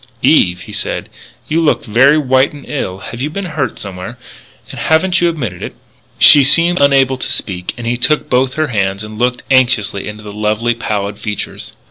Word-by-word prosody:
"Eve," 90 0 +3
he - - -11
said, - - -4 0.4
"you 165 +2 0
look 155 - +1
very 130 +7 +4
white 130 -1 +2
and 145 -2 -12
ill. 95 -10 -4
Have 120 +5 -8
you 145 - -1
been 195 +5 -5
hurt 150 -8 -3
somewhere, 100 +5 -8 0.5
and - - -9
haven't 175 +3 +2
you 175 - +3
admitted 120 - -5
it?" - - -7 0.4
She 145 - +7
seemed 170 +6 +5
unable 135 -2 +3
to - - -4
speak, 90 -3 -3
and 120 - -7
he 120 +1 -1
took 150 +5 +1
both 130 +1 +1
her 155 -1 -1
hands 100 -3 -1
and 105 0 -9
looked 125 0 0
anxiously 120 -6 +2
into 105 0 -8
the 105 -1 -9
lovely, 105 +3 0
pallid 105 -3 -4
features. 105 -2 -6
125 Hz, 190 wpm, -15 LUFS, 105-145 Hz, 0.5 s, She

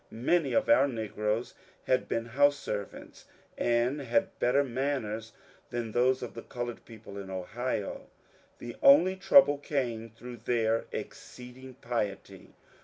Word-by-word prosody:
Many 140 +7 0
of 275 -1 +2
our 290 - +5
negroes 110 -2 -2 0.3
had 130 - +1
been 115 0 -2
house 145 +4 +3
servants, 105 -7 -7 0.3
and 120 +4 +1
had 190 +10 0
better 135 +4 +3
manners 120 -4 -3 0.4
than 120 -2 -4
most 125 +3 +2
of - - -6
the - - -7
coloured 120 -1 -6
people 110 -3 -10
in 95 -1 -8
Ohio. 100 +4 -4 0.5
The 120 -1 -8
only 165 +7 +6
trouble 185 -6 +5
came 120 -6 -3
through 120 +2 -10
their 115 0 0
exceeding 125 +1 -9
piety. 110 -5 -5
120 Hz, 130 wpm, -29 LUFS, 115-140 Hz, 0.5 s, only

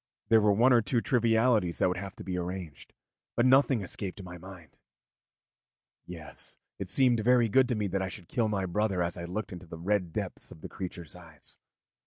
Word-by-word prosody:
There 110 -1 +6
were 105 0 +4
one 120 +6 +5
or 120 - +6
two 120 +2 0
trivialities 115 -6 +2
that - - +3
would 90 - -1
have 100 0 -7
to - - -9
be 95 - -3
arranged, 90 -3 -5 0.4
but 120 - +3
nothing 130 -2 +5
escaped 95 +1 -4
my 90 -1 -9
mind. 90 -4 -13 1.3
Yes, 80 -4 -8 0.2
it 95 -2 -5
seemed 125 +1 +3
to 110 - -2
me - - -9
very 120 -2 +4
good 130 +4 +4
that 105 -6 -1
I 95 - -2
should 90 -2 -9
kill 115 -3 0
my 100 -3 -1
brother 95 0 0
as 85 0 -1
I 85 - -6
looked 105 +6 -4
into 90 0 -10
the 80 - -8
red 90 0 0
depths - - -5
of 80 - -12
this - - -8
creature's 85 -4 -7
eyes. 85 -4 -9
95 Hz, 205 wpm, -29 LUFS, 90-115 Hz, 1.3 s, There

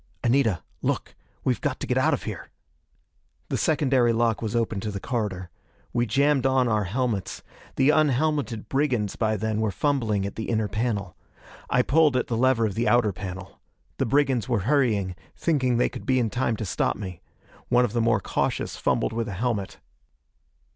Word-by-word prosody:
"Anita! 120 -6 +2 0.2
Look! - - -2 0.3
We've - - 0
got - - -2
to - - -3
get - - 0
out - - +3
of - - -9
here!" - - -6 1.0
The - - -1
secondary 135 -6 +2
lock 115 -1 +1
was 110 0 -3
open 115 -3 0
to 105 - -4
the 100 -1 -4
corridor. 95 -7 -3 0.4
We 120 0 +1
jammed 135 +3 +2
on 130 -1 +2
our 105 -3 +1
helmets. 105 -2 -2 0.3
The 135 +2 +4
unhelmeted 145 -5 +1
brigands 130 -8 0
by 110 -1 0
then 110 +1 -1
were 110 - +1
fumbling 110 - 0
at 100 - -4
the 110 - -4
inner 110 -2 +1
panel. 105 -5 -2 0.5
I 125 0 +3
pulled 150 -2 +3
at 125 - 0
the 120 - -2
lever 120 -1 +3
of 105 - -1
the 115 +5 -1
outer 120 -4 +3
panel. 95 +1 -8 0.4
The - - +1
brigands 130 -1 +1
were 115 -5 +1
hurrying, 110 -6 +1 0.2
thinking 130 -7 +1
they 125 - +3
could - - -9
be 130 -1 +3
in 115 -4 +1
time 120 -2 0
to 110 - -4
stop 90 - 0
me. 90 -3 -7 0.5
One 125 0 +4
of 110 - -5
the 120 - +1
more 115 -2 +3
cautious - - -2
fumbled - - 0
with 115 0 -2
a 100 - -4
helmet. 105 -1 -2
115 Hz, 185 wpm, -25 LUFS, 105-130 Hz, 1.0 s, The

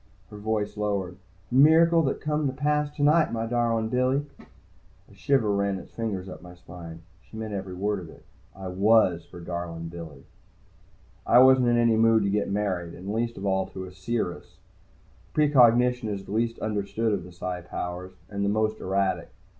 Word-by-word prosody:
Her 105 - -9
voice 105 0 -2
lowered. 100 -3 -2 0.3
"A - - -6
miracle 165 +5 +6
that 135 - -1
come 150 -1 0
to 130 - -2
pass 150 +2 0
tonight, 150 +3 +3
my 115 -1 -2
darlin' 115 -1 0
Billy." 130 +4 +1
A - - -24
shiver 130 -7 +1
ran 100 -1 0
its - - -11
fingers 100 -5 -3
up 95 - -9
my 90 0 -12
spine. 85 -2 -11 0.2
She 110 - -13
meant 110 -1 -5
every 95 -2 -5
word 100 +2 -1
of 85 -3 -10
it. - - -16 0.3
I 95 -1 -7
was 95 -3 +3
her 90 - -10
darlin' 85 -1 -5
Billy. 80 -5 -10 1.0
I 120 - +6
wasn't 130 0 +6
in 120 0 +3
any 115 -1 +3
mood 115 -1 +4
to 100 - 0
get 105 0 0
married, 95 -4 -2
and 95 +3 -6
least 115 +1 -2
of 95 - -6
all 95 -1 +1
to 95 - -8
a 90 - -10
seeress. 95 0 -4 0.8
Precognition 125 -5 +4
is 100 -2 -5
the - - -10
least 115 +2 0
understood 110 +1 -1
of 95 -4 -2
the 90 - -12
Psi 90 +1 -5
powers, 90 +1 -6
and 100 -1 -4
the 100 - +1
most 110 +1 0
erratic. 95 -2 -1
105 Hz, 185 wpm, -26 LUFS, 95-120 Hz, 1.0 s, miracle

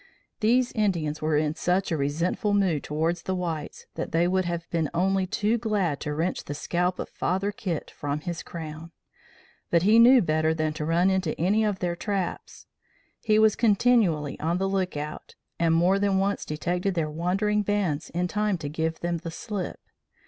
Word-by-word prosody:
These 240 +3 +3
Indians 170 -9 -1
were 155 -1 +1
in 150 0 +1
such 180 +3 0
a - - +2
resentful 165 +8 0
mood 185 -7 +2
towards 165 +3 -1
the 190 - -2
whites 165 -4 -4
that - - -4
they 170 +2 +2
would 185 0 +1
have 170 -1 -3
been 160 -3 0
only 190 +2 +1
too 215 +4 0
glad 200 - 0
to 150 - -3
wrench 170 +4 -1
the 145 - -5
scalp 180 +4 -1
of - - -4
Father 190 +3 -1
Kit 175 -6 -4
from 145 +1 -4
his 170 +1 -4
crown; 160 0 -8 0.8
but 170 0 +3
he 215 +4 +6
knew 250 +3 +8
better 155 0 +1
than 155 -1 -1
to 155 0 -4
run 170 +4 +3
into 185 -4 -1
any 200 +6 +2
of 210 -3 0
their 175 -2 -2
traps. 195 -1 -4 0.6
He 215 -1 +3
was 220 -1 +5
continually 205 - +2
on 165 +3 0
the 195 +1 0
lookout, 180 -6 -3 0.2
and 165 -1 +3
more 180 +4 +3
than 200 -1 +2
once 200 +1 0
detected 180 +5 -2
their 155 -3 -1
wandering 195 +6 0
bands 195 -7 -1
in 175 +1 -1
time 210 0 0
to 145 -3 -5
give 160 +2 -2
them 175 0 -1
the 165 0 -6
slip. 195 +2 -5
175 Hz, 185 wpm, -26 LUFS, 160-200 Hz, 0.8 s, knew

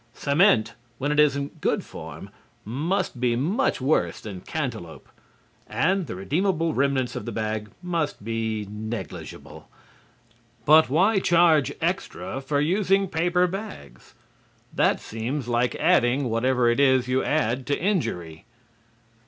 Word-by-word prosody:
Cement, 140 - +3 0.2
when 145 +4 -1
it 150 - +1
is 150 -2 +5
in 140 0 -3
good - - 0
form, - - -10 0.3
must 155 - -2
be 120 -1 +1
much 165 - 0
worse 135 +4 +1
than 100 -4 -8
cantaloup, 120 - -5 0.6
and 165 - 0
the 100 - -5
redeemable 165 - 0
remnants 135 -2 0
of - - -5
the 120 - -4
bag 110 0 -3
must 165 - -2
be 110 -2 -2
negligible. 110 +3 -8 1.0
But 155 +1 +6
why 195 +9 +3
charge 165 -6 +4
extra 170 -5 -3
for 140 +1 -1
using 195 +4 +2
paper 175 +2 +2
bags? 195 - -8 0.6
That - - +2
seems 120 +4 -4
like 120 +1 +1
adding 135 -6 +2
whatever 125 +1 +2
it 120 +2 +2
is 130 -2 +4
you 130 +1 +1
add 130 -4 0
to 145 - 0
injury. 90 - -2
140 Hz, 130 wpm, -25 LUFS, 120-170 Hz, 1.0 s, But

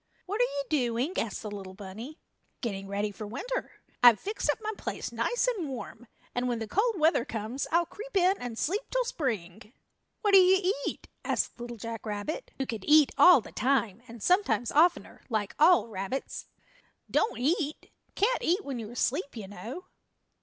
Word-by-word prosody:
"What 410 +5 -1
are - - +6
you 285 - -3
doing?" 255 +1 0
asked 225 0 -2
the 210 - -5
little 190 -2 -8
bunny. 215 - -8 0.4
"Getting 195 -5 -4
ready 205 +1 -2
for 210 +1 -7
winter. 475 - -4 0.3
I've 240 -3 +8
fixed 415 -6 -3
up 295 - +2
my 435 0 -3
place - - -5
nice 485 0 0
and 395 - -1
warm, 245 -1 -8 0.3
and 245 +1 -1
when 240 -1 0
the 225 -1 -4
cold 415 - +1
weather 315 -5 +4
comes 225 +4 -4
I'll 340 +1 +3
creep 435 +5 -6
in 370 +1 +4
and 245 -2 -6
sleep 390 - 0
till - - 0
Spring." 220 - -4 0.5
"What 415 - +2
do 390 - +10
you 375 +1 +4
eat?" - - -5 0.2
asked - - -1
Little 240 0 -6
Jack 225 +1 -6
Rabbit, 210 - -4
who 270 - -1
could 225 -6 -5
eat 300 -1 +6
all 360 -8 +8
the - - -12
time, 235 -4 0
and 230 -2 -10
sometimes 360 - +2
oftener, 340 +4 +2
like 215 -4 -1
all 335 -2 +6
rabbits. 205 +5 -5 0.6
"Don't 440 - +1
eat 300 +3 -1 0.2
can't 475 +5 +2
eat 370 +5 +1
when 270 -4 -4
you're 225 +1 -7
asleep, 280 +2 -1
you 205 -3 -6
know." 220 - -8
260 Hz, 180 wpm, -29 LUFS, 225-360 Hz, 0.6 s, do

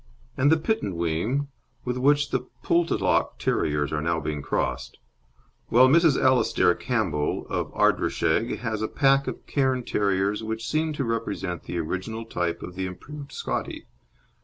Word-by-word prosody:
And 140 +3 +3
the 160 - +5
Pittenweem, 105 - -1 0.4
with 125 0 -1
which 145 +3 +2
the - - -1 0.2
Poltalloch 170 0 +1
Terriers 75 0 0
are 75 - 0
now 80 +1 0
being 75 -1 -3
crossed; - - -2 0.7
while 125 +3 +6
Mrs. 160 0 +4
Alastair 120 -8 +3
Campbell, 85 - -1
of - - -2
Ardrishaig, 110 +9 +1
has 110 -3 -2
a 110 - 0
pack 135 +1 +3
of - - -5
Cairn 130 -3 0
Terriers 100 -1 0
which 110 +1 -4
seem 155 +1 0
to 145 - -2
represent 105 -7 -3
the 90 - -4
original 95 +7 -3
type 90 -5 -2
of 90 - -7
the 95 +1 -3
improved 140 +10 -9
Scottie. - - -4
115 Hz, 145 wpm, -25 LUFS, 90-135 Hz, 0.7 s, while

